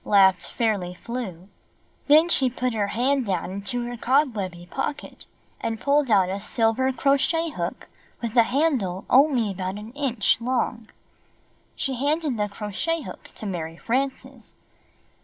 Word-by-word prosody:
laughed 190 Hz, -3 st, +4 dB
Fairly 200 Hz, -6 st, -1 dB
Flew. 195 Hz, -6 st, -6 dB, 0.6 s
Then 310 Hz, +3 st, +7 dB
she 270 Hz, -6 st, +3 dB
put 250 Hz, 0 st, -2 dB
her 210 Hz, -2 st, 0 dB
hand 255 Hz, +3 st, +1 dB
down 185 Hz, -2 st, -1 dB
into 200 Hz, +5 st, -3 dB
her 240 Hz, 0 st, -5 dB
cobwebby 225 Hz, -, 0 dB
pocket 285 Hz, +2 st, -5 dB, 0.3 s
and 225 Hz, -1 st, -3 dB
pulled 280 Hz, +1 st, +2 dB
out 195 Hz, -4 st, +4 dB
a 190 Hz, +2 st, -3 dB
silver 225 Hz, +4 st, +1 dB
crochet 280 Hz, +5 st, +2 dB
hook -, -, -5 dB, 0.3 s
with 235 Hz, 0 st, -4 dB
a 240 Hz, -, +8 dB
handle 250 Hz, -, 0 dB
only 255 Hz, -6 st, +4 dB
about 185 Hz, +1 st, -4 dB
an 215 Hz, +2 st, -9 dB
inch 250 Hz, -6 st, 0 dB
long. 235 Hz, -2 st, -1 dB, 0.9 s
She 270 Hz, -, -2 dB
handed 290 Hz, +2 st, 0 dB
the 210 Hz, -1 st, -1 dB
crochet 215 Hz, -, -3 dB
hook -, -, -9 dB
to -, -, -7 dB
Mary 165 Hz, -4 st, -4 dB
Frances. 265 Hz, +6 st, -3 dB
235 Hz, 140 wpm, -24 LUFS, 200-270 Hz, 0.9 s, a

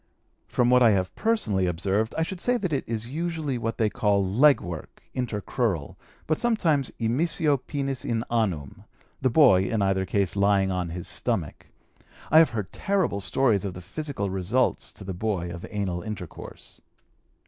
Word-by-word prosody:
From 125 Hz, 0 st, +2 dB
what 125 Hz, 0 st, +6 dB
I 120 Hz, -, +7 dB
have 95 Hz, -1 st, -2 dB
personally 110 Hz, -, +1 dB
observed 95 Hz, +6 st, -1 dB
I 160 Hz, -, +2 dB
should 180 Hz, +2 st, -5 dB
say 245 Hz, 0 st, +2 dB
that 185 Hz, -8 st, -2 dB
it 140 Hz, -, 0 dB
is 115 Hz, -1 st, -3 dB
usually 155 Hz, -1 st, -3 dB
what 115 Hz, 0 st, -3 dB
they 110 Hz, -, +2 dB
call 105 Hz, -3 st, +1 dB
"leg 135 Hz, +9 st, +5 dB
work" 85 Hz, -4 st, -8 dB
(intercrural), 110 Hz, -, -2 dB, 0.3 s
but 155 Hz, -, 0 dB
sometimes 165 Hz, -, +1 dB
immissio 145 Hz, +4 st, +1 dB
penis 135 Hz, -3 st, -2 dB
in 115 Hz, -1 st, -1 dB
anum, 95 Hz, -, -1 dB, 0.4 s
the 130 Hz, -, +3 dB
boy, 115 Hz, -9 st, +5 dB
in 105 Hz, 0 st, 0 dB
either 95 Hz, -1 st, +1 dB
case, 100 Hz, -2 st, 0 dB
lying 100 Hz, -1 st, +3 dB
on 90 Hz, -2 st, -2 dB
his 85 Hz, +1 st, -5 dB
stomach. -, -, -2 dB, 0.6 s
I 155 Hz, -, +8 dB
have 160 Hz, -4 st, +6 dB
heard 105 Hz, -5 st, -4 dB
terrible 195 Hz, -, 0 dB
stories 115 Hz, -2 st, +2 dB
of 95 Hz, -3 st, -4 dB
the -, -, -7 dB
physical 100 Hz, -, -4 dB
results 95 Hz, +7 st, 0 dB
to -, -, -10 dB
the 95 Hz, 0 st, -5 dB
boy 90 Hz, -3 st, -2 dB
of 85 Hz, 0 st, -7 dB
anal 95 Hz, -4 st, -2 dB
intercourse. 105 Hz, -5 st, -8 dB
110 Hz, 170 wpm, -26 LUFS, 95-140 Hz, 0.6 s, I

